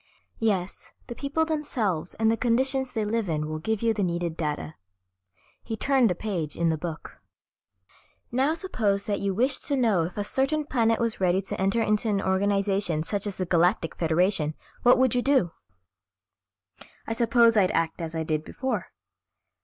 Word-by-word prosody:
"Yes, 195 Hz, -5 st, -2 dB
the 240 Hz, -, -6 dB
people 285 Hz, +5 st, -1 dB
themselves 240 Hz, -, -2 dB
and 220 Hz, 0 st, +2 dB
the -, -, +2 dB
conditions 260 Hz, +3 st, +1 dB
they 220 Hz, -3 st, -2 dB
live 215 Hz, -2 st, -1 dB
in 155 Hz, -1 st, -1 dB
will 155 Hz, 0 st, -4 dB
give 220 Hz, +6 st, -2 dB
you 225 Hz, -1 st, +3 dB
the 210 Hz, -, -3 dB
needed 170 Hz, -2 st, -1 dB
data." 150 Hz, -1 st, -3 dB, 0.9 s
He 225 Hz, -1 st, -5 dB
turned 265 Hz, -1 st, +3 dB
a 180 Hz, -, 0 dB
page 175 Hz, -7 st, -4 dB
in 170 Hz, 0 st, +1 dB
the 160 Hz, -, +1 dB
book. 165 Hz, -1 st, -7 dB, 1.1 s
"Now 270 Hz, +6 st, +1 dB
suppose 220 Hz, -, -1 dB
that 205 Hz, -2 st, -1 dB
you 195 Hz, -1 st, -1 dB
wished 255 Hz, +6 st, +1 dB
to 280 Hz, -, +1 dB
know 220 Hz, -8 st, +3 dB
if 170 Hz, +4 st, -4 dB
a 205 Hz, -, 0 dB
certain 275 Hz, +7 st, 0 dB
planet 230 Hz, -5 st, +1 dB
was 230 Hz, -3 st, -1 dB
ready 185 Hz, 0 st, +3 dB
to 190 Hz, -, -5 dB
enter 195 Hz, +4 st, +2 dB
into 215 Hz, +1 st, +1 dB
an 200 Hz, -2 st, +1 dB
organization 195 Hz, -3 st, +1 dB
such 200 Hz, +4 st, -2 dB
as 200 Hz, -, -4 dB
the 185 Hz, -, -2 dB
Galactic 175 Hz, 0 st, +2 dB
Federation, 165 Hz, -1 st, +1 dB, 0.3 s
what 245 Hz, -, +6 dB
would 260 Hz, -2 st, +3 dB
you 250 Hz, -, +2 dB
do?" 260 Hz, -11 st, +2 dB, 1.5 s
"I 225 Hz, -, -2 dB
suppose 235 Hz, 0 st, +4 dB
I'd 195 Hz, -4 st, +4 dB
act 165 Hz, 0 st, -1 dB
as 165 Hz, 0 st, -5 dB
I 160 Hz, -, -1 dB
did 155 Hz, -1 st, -1 dB
before. 260 Hz, +10 st, -3 dB
205 Hz, 175 wpm, -26 LUFS, 175-240 Hz, 1.5 s, what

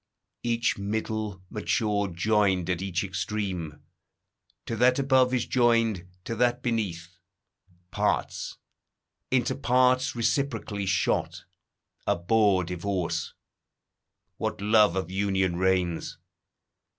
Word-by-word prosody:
Each 115 Hz, -2 st, 0 dB
middle 105 Hz, -1 st, -3 dB
nature 105 Hz, -1 st, 0 dB
joined 95 Hz, -1 st, +1 dB
at 90 Hz, 0 st, -2 dB
each 95 Hz, -2 st, -1 dB
extreme, 95 Hz, -5 st, -4 dB, 0.8 s
To 115 Hz, -, -3 dB
that 125 Hz, +2 st, +4 dB
above 130 Hz, -2 st, +3 dB
is 125 Hz, -2 st, 0 dB
joined, 115 Hz, -7 st, +2 dB, 0.2 s
to 115 Hz, -, -4 dB
that 120 Hz, +1 st, +1 dB
beneath; 90 Hz, -7 st, -3 dB, 0.7 s
Parts, -, -, -1 dB, 0.7 s
into 125 Hz, -2 st, +1 dB
parts 130 Hz, 0 st, +2 dB
reciprocally 115 Hz, -5 st, -1 dB
shot, 95 Hz, -1 st, 0 dB, 0.6 s
Abhor 100 Hz, +1 st, +3 dB
divorce: 90 Hz, -1 st, -3 dB, 1.0 s
what -, -, -3 dB
love 105 Hz, -2 st, +4 dB
of 95 Hz, -2 st, -2 dB
union 95 Hz, -2 st, 0 dB
reigns! 90 Hz, -2 st, 0 dB
100 Hz, 95 wpm, -27 LUFS, 95-115 Hz, 1.0 s, that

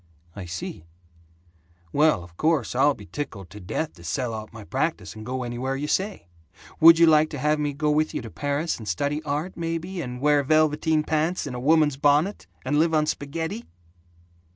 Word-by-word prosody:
"I 100 Hz, -, -7 dB
see. 85 Hz, -1 st, -7 dB, 1.1 s
Well, 150 Hz, -, +3 dB
of 85 Hz, 0 st, -15 dB
course, 155 Hz, -, +1 dB
I'll 140 Hz, +3 st, +3 dB
be 105 Hz, -, -12 dB
tickled 100 Hz, -, -7 dB
to 105 Hz, -, -10 dB
death 110 Hz, -, -3 dB
to 85 Hz, -, -16 dB
sell 115 Hz, +9 st, -2 dB
out 110 Hz, -1 st, -7 dB
my 115 Hz, -2 st, -10 dB
practise 130 Hz, -, -2 dB
and 110 Hz, -, -9 dB
go 130 Hz, +2 st, -3 dB
anywhere 125 Hz, +2 st, -3 dB
you 140 Hz, +2 st, -3 dB
say. 190 Hz, -, -2 dB, 0.5 s
Would 165 Hz, +1 st, +9 dB
you 170 Hz, -, +7 dB
like 155 Hz, -1 st, +5 dB
to 150 Hz, -, -6 dB
have 150 Hz, +3 st, +1 dB
me 145 Hz, -1 st, -1 dB
go 150 Hz, +2 st, 0 dB
with 155 Hz, +1 st, +1 dB
you -, -, -3 dB
to 115 Hz, -, -8 dB
Paris 145 Hz, +2 st, -2 dB
and 110 Hz, -, -9 dB
study 145 Hz, -, -1 dB
art, 150 Hz, +4 st, -3 dB
maybe, 170 Hz, +2 st, -3 dB
and 125 Hz, -3 st, -6 dB
wear 145 Hz, +1 st, +3 dB
velveteen 155 Hz, +1 st, +2 dB
pants 160 Hz, +4 st, 0 dB
and 125 Hz, -, -5 dB
a -, -, -4 dB
woman's 150 Hz, +1 st, +3 dB
bonnet, 145 Hz, +8 st, +2 dB, 0.2 s
and 145 Hz, +3 st, +1 dB
live 160 Hz, 0 st, +3 dB
on 155 Hz, -1 st, +3 dB
spaghetti?" 155 Hz, -3 st, -4 dB
145 Hz, 195 wpm, -25 LUFS, 120-155 Hz, 1.1 s, Would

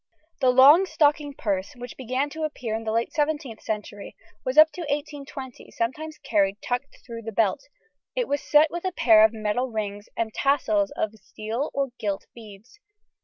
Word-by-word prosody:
The 260 Hz, -3 st, +3 dB
long 285 Hz, +9 st, +7 dB
stocking 295 Hz, -3 st, +1 dB
purse 195 Hz, -6 st, -2 dB
which 245 Hz, 0 st, -9 dB
began 260 Hz, +3 st, -2 dB
to 315 Hz, -, -7 dB
appear 255 Hz, -7 st, -3 dB
in 225 Hz, +1 st, -3 dB
the 220 Hz, -, -1 dB
late 230 Hz, +1 st, -1 dB
17th 295 Hz, -6 st, -1 dB
century 210 Hz, -1 st, -5 dB, 0.3 s
was 255 Hz, +3 st, -3 dB
up 310 Hz, 0 st, +8 dB
to 350 Hz, -, -8 dB
1820 285 Hz, -4 st, -6 dB
sometimes 305 Hz, +7 st, -4 dB
carried 200 Hz, -2 st, 0 dB
tucked 250 Hz, +3 st, -4 dB
through 230 Hz, -2 st, -7 dB
the 225 Hz, 0 st, -6 dB
belt; 220 Hz, -, 0 dB, 0.5 s
it -, -, 0 dB
was 285 Hz, 0 st, -1 dB
set 300 Hz, +1 st, +4 dB
with 345 Hz, 0 st, -5 dB
a 375 Hz, -, -1 dB
pair 220 Hz, -7 st, +6 dB
of 220 Hz, -, +5 dB
metal 225 Hz, +3 st, -2 dB
rings 205 Hz, -2 st, -5 dB
and 220 Hz, -1 st, -2 dB
tassels 220 Hz, -8 st, +1 dB
of 215 Hz, -, -1 dB
steel 220 Hz, +7 st, -4 dB
or 275 Hz, -1 st, 0 dB
gilt 200 Hz, -2 st, -3 dB
beads. 220 Hz, -, -14 dB
250 Hz, 175 wpm, -25 LUFS, 220-290 Hz, 0.5 s, up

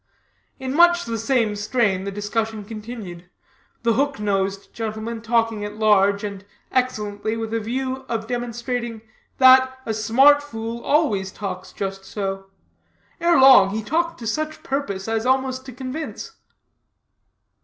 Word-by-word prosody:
In 260 Hz, 0 st, -3 dB
much 345 Hz, +2 st, +5 dB
the 230 Hz, -1 st, -3 dB
same 225 Hz, -2 st, +1 dB
strain 205 Hz, -3 st, 0 dB
the 200 Hz, -, -3 dB
discussion 210 Hz, +1 st, -3 dB
continued 210 Hz, -5 st, -8 dB, 0.5 s
the 230 Hz, -1 st, +3 dB
hook 280 Hz, 0 st, 0 dB
nosed 195 Hz, -1 st, -2 dB
gentleman 225 Hz, 0 st, -4 dB
talking 225 Hz, -2 st, 0 dB
at 210 Hz, 0 st, -6 dB
large 200 Hz, -2 st, +3 dB
and 200 Hz, -2 st, -5 dB, 0.3 s
excellently, 220 Hz, -4 st, -1 dB
with 225 Hz, 0 st, -4 dB
a 230 Hz, -, +1 dB
view 260 Hz, +4 st, -2 dB
of 225 Hz, -2 st, -2 dB
demonstrating 240 Hz, -1 st, -4 dB, 0.3 s
that 260 Hz, 0 st, +6 dB
a 225 Hz, -, -1 dB
smart 265 Hz, +7 st, +5 dB
fool 230 Hz, -4 st, -6 dB
always 210 Hz, -11 st, +1 dB
talks 190 Hz, -2 st, -6 dB
just 195 Hz, -1 st, -5 dB
so. 195 Hz, -1 st, -4 dB, 0.7 s
Ere 340 Hz, -2 st, +4 dB
long 260 Hz, -8 st, +8 dB
he 220 Hz, -, -2 dB
talked 335 Hz, +7 st, -1 dB
to 235 Hz, -, -9 dB
such 310 Hz, +7 st, -3 dB
purpose 215 Hz, -9 st, -3 dB
as 225 Hz, 0 st, -1 dB
almost 260 Hz, 0 st, 0 dB
to -, -, -7 dB
convince. 260 Hz, +5 st, -6 dB
225 Hz, 140 wpm, -22 LUFS, 205-260 Hz, 0.7 s, long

